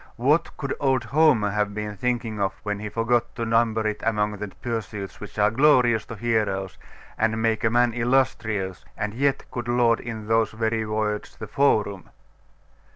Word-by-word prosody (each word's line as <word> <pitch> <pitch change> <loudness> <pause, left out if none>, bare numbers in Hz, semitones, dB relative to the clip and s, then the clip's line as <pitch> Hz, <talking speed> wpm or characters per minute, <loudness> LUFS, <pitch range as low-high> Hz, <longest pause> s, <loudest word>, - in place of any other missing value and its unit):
What 150 +7 +1
could 140 -2 -3
old 130 -3 +2
Homer 120 -4 +3
have 105 0 -1
been 105 -1 -4
thinking 115 0 -2
of 95 -1 0
when 105 -1 -2
he 105 0 -5
forgot 115 +2 0
to 115 - -2
number 115 -1 +2
it 105 -1 -2
among 105 -1 0
the 105 +1 -5
pursuits 105 -3 -5
which 105 - -10
are 105 0 +3
glorious 125 -4 +4
to 115 - -7
heroes, 105 -4 -1 0.4
and 110 0 +1
make 110 -1 +1
man 120 0 +3
illustrious, 115 -6 0
and 105 -1 -3
yet 140 +3 0
could 120 -1 -5
laud 120 -1 +3
in 110 -3 -6
those 115 -1 +2
very 110 0 -1
words 105 -1 -2
the 110 - -6
forum? 105 -6 +1
110 Hz, 165 wpm, -24 LUFS, 105-120 Hz, 0.4 s, glorious